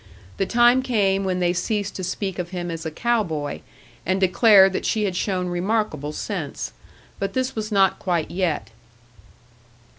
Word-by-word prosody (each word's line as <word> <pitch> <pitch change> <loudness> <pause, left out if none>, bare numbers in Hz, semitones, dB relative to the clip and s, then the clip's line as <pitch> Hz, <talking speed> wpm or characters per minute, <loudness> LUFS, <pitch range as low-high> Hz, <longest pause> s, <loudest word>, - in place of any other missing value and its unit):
The 195 - 0
time 240 +2 +5
came 200 -6 +1
when 185 -1 0
they 175 -1 +2
ceased 200 +3 -2
to 185 - -5
speak 190 +1 -3
of 175 -1 -3
him 175 -1 -4
as 165 0 -5
a - - -2
cow 235 +8 +1
boy, 155 -5 -4 0.4
and 185 +2 0
declared 195 0 +6
that - - -2
she 215 - 0
had 190 -3 -1
shown 185 -1 -1
remarkable 175 -5 -1
sense. 160 -3 -5 0.5
But 195 0 -2
this 260 0 -1
was 215 0 -4
not 195 -2 +3
quite 175 -4 -1
yet. 175 -3 -1
190 Hz, 170 wpm, -23 LUFS, 175-210 Hz, 0.5 s, declared